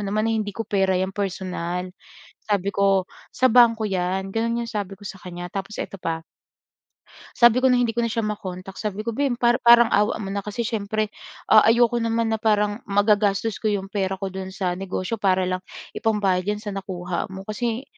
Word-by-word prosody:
naman 215 Hz, +2 st, 0 dB
na 225 Hz, -, +1 dB
hindi 215 Hz, -2 st, -1 dB
ko 225 Hz, -, -3 dB
pera 190 Hz, -2 st, +1 dB
'yan 190 Hz, +1 st, -1 dB
personal.” 180 Hz, -2 st, -3 dB, 0.6 s
Sabi 200 Hz, -1 st, 0 dB
ko, 195 Hz, -2 st, +3 dB, 0.3 s
“Sa 255 Hz, -, +3 dB
bangko 230 Hz, -2 st, +5 dB
'yan.” 190 Hz, +1 st, -1 dB
‘Yan 230 Hz, +2 st, 0 dB
'yong 235 Hz, 0 st, -5 dB
sabi 200 Hz, -3 st, -4 dB
ko 200 Hz, -, -20 dB
sa 195 Hz, -1 st, -7 dB
kanya. 175 Hz, 0 st, -7 dB
Tapos 195 Hz, +2 st, -5 dB
eto -, -, -8 dB
pa. 165 Hz, -1 st, -3 dB, 1.1 s
Sabi 240 Hz, +1 st, +6 dB
ko 260 Hz, -, +4 dB
no’ng 250 Hz, -1 st, +4 dB
hindi 225 Hz, -1 st, -2 dB
ko -, -, +2 dB
na -, -, 0 dB
siya 230 Hz, -, -1 dB
ma-contact, 195 Hz, -3 st, -6 dB
sabi 210 Hz, -1 st, -3 dB
ko, 235 Hz, -, -1 dB
“Beh, 275 Hz, +2 st, 0 dB
pa 240 Hz, 0 st, +3 dB
parang 235 Hz, -1 st, +7 dB
awa 210 Hz, +1 st, +3 dB
mo 195 Hz, -, -5 dB
na 200 Hz, -, -1 dB
kasi 210 Hz, +3 st, -3 dB
siyempre 215 Hz, -1 st, -2 dB, 0.4 s
ah 215 Hz, -, +8 dB
ayoko 235 Hz, +1 st, +4 dB
naman 230 Hz, 0 st, 0 dB
na 220 Hz, -, 0 dB
parang 210 Hz, 0 st, +1 dB
magagastos 205 Hz, +1 st, +2 dB
ko 215 Hz, -, 0 dB
'yong 195 Hz, -2 st, -2 dB
pera 195 Hz, -2 st, -1 dB
ko 195 Hz, 0 st, -4 dB
do'n 190 Hz, 0 st, -6 dB
sa 185 Hz, -2 st, -1 dB
negosyo 190 Hz, +2 st, -3 dB
para 190 Hz, -2 st, +2 dB
lang 185 Hz, 0 st, -1 dB, 0.4 s
ipambayad 200 Hz, -4 st, +1 dB
diyan 210 Hz, 0 st, -1 dB
sa 210 Hz, -, -4 dB
nakuha 185 Hz, -2 st, -4 dB
mo.” 190 Hz, 0 st, -7 dB
Kasi 230 Hz, +4 st, -3 dB
205 Hz, 200 wpm, -23 LUFS, 190-225 Hz, 1.1 s, ah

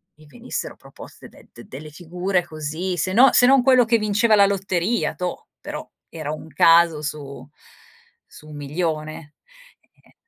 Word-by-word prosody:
mi 155 Hz, -, -20 dB
venissero 145 Hz, -, -6 dB
proposte -, -, -14 dB
de -, -, -20 dB
d 120 Hz, -, -13 dB
delle 150 Hz, +3 st, -10 dB
figure 180 Hz, +3 st, -2 dB
così, 160 Hz, +4 st, -5 dB
se 185 Hz, +2 st, -1 dB
no 250 Hz, +4 st, +6 dB
se 245 Hz, -, +5 dB
non 270 Hz, 0 st, +5 dB
quello 255 Hz, -1 st, +4 dB
che 230 Hz, +1 st, +2 dB
vinceva 215 Hz, +1 st, +1 dB
la 200 Hz, -1 st, +5 dB
lotteria, 195 Hz, +2 st, -1 dB
toh, 180 Hz, -1 st, -5 dB
però -, -, -8 dB, 0.2 s
era 155 Hz, -3 st, -6 dB
un 155 Hz, -, -8 dB
caso 165 Hz, +1 st, +4 dB
su 145 Hz, -2 st, -7 dB, 0.8 s
su 150 Hz, -, -16 dB
un 150 Hz, -, -11 dB
milione, 155 Hz, 0 st, -5 dB, 0.7 s
e -, -, -26 dB
170 Hz, 160 wpm, -21 LUFS, 155-200 Hz, 0.8 s, no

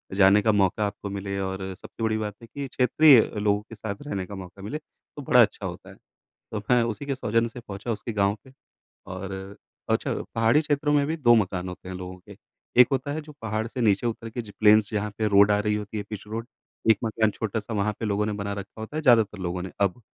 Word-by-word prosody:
जाने 100 Hz, +1 st, +6 dB
का 110 Hz, -, +3 dB
मौका 105 Hz, +1 st, +2 dB
आपको 100 Hz, 0 st, -6 dB
मिले 100 Hz, 0 st, -4 dB
और 95 Hz, 0 st, -3 dB
सबसे 115 Hz, +4 st, -9 dB
बड़ी 110 Hz, -1 st, +1 dB
बात 105 Hz, -2 st, -4 dB
है 115 Hz, -, -12 dB
कि 140 Hz, +4 st, -6 dB
क्षेत्रीय 130 Hz, +2 st, +6 dB, 0.2 s
लोगों 105 Hz, 0 st, +1 dB
के 115 Hz, +1 st, -12 dB
साथ 105 Hz, -1 st, -5 dB
रहने 95 Hz, -9 st, -3 dB
का 100 Hz, +2 st, -8 dB
मौका 95 Hz, +1 st, -10 dB
मिले, 105 Hz, +10 st, -4 dB
तो 150 Hz, -1 st, -15 dB
बड़ा 125 Hz, -2 st, +5 dB
अच्छा 105 Hz, -3 st, +1 dB
होता 90 Hz, -2 st, -7 dB
है। -, -, -13 dB, 0.6 s
तो 105 Hz, -, -2 dB
मैं 125 Hz, -1 st, +5 dB
उसी 115 Hz, +4 st, -3 dB
के 140 Hz, -1 st, -1 dB
सौजन्य 115 Hz, -1 st, 0 dB
से 120 Hz, -, -10 dB
पहुँचा 105 Hz, 0 st, -6 dB
उसके 115 Hz, +2 st, -4 dB
गाँव 100 Hz, 0 st, +2 dB
पे 130 Hz, -, -16 dB, 0.6 s
और 95 Hz, +1 st, -6 dB, 0.6 s
अ, -, -, +5 dB
छ -, -, -14 dB, 0.3 s
पहाड़ी 115 Hz, +6 st, +4 dB
क्षेत्रों 145 Hz, -1 st, 0 dB
में 145 Hz, -1 st, +3 dB
भी 160 Hz, -, -1 dB
2 120 Hz, -6 st, +5 dB
मकान 95 Hz, -4 st, 0 dB
होते 90 Hz, 0 st, -9 dB
हैं 95 Hz, -, -5 dB
लोगों 90 Hz, 0 st, -7 dB
के, 100 Hz, +2 st, -14 dB, 0.4 s
एक 125 Hz, -, +8 dB
होता 135 Hz, +2 st, -1 dB
है 155 Hz, -, -3 dB
जो 150 Hz, 0 st, -12 dB
पहाड़ 110 Hz, 0 st, -2 dB
से 125 Hz, +2 st, -6 dB
नीचे 110 Hz, 0 st, +2 dB
उतर 115 Hz, 0 st, -4 dB
के 120 Hz, +2 st, -4 dB
ज 105 Hz, -, -12 dB
प्लेन्स 105 Hz, 0 st, +6 dB
जहाँ 105 Hz, 0 st, -1 dB
पे 110 Hz, -1 st, +1 dB
रोड 100 Hz, 0 st, +6 dB
आ 105 Hz, -, +3 dB
रही 105 Hz, 0 st, 0 dB
होती 105 Hz, 0 st, -4 dB
है, 105 Hz, -, -2 dB
पिच 105 Hz, -2 st, -6 dB
रोड, 115 Hz, +2 st, -5 dB, 0.4 s
एक 110 Hz, -, +5 dB
मकान 110 Hz, -1 st, +1 dB
छोटा-सा 110 Hz, +1 st, -4 dB
वहाँ 105 Hz, +1 st, +1 dB
पे 115 Hz, -, -1 dB
लोगों 105 Hz, 0 st, 0 dB
ने 105 Hz, -, -1 dB
बना 100 Hz, 0 st, -3 dB
रखा 100 Hz, +2 st, -8 dB
होता 110 Hz, +7 st, -6 dB
है 155 Hz, -, -1 dB
ज़्यादातर 115 Hz, -6 st, +4 dB
लोगों 90 Hz, -1 st, -3 dB
ने 95 Hz, -, -6 dB
अब। 100 Hz, +4 st, +1 dB
105 Hz, 245 wpm, -26 LUFS, 100-115 Hz, 0.6 s, एक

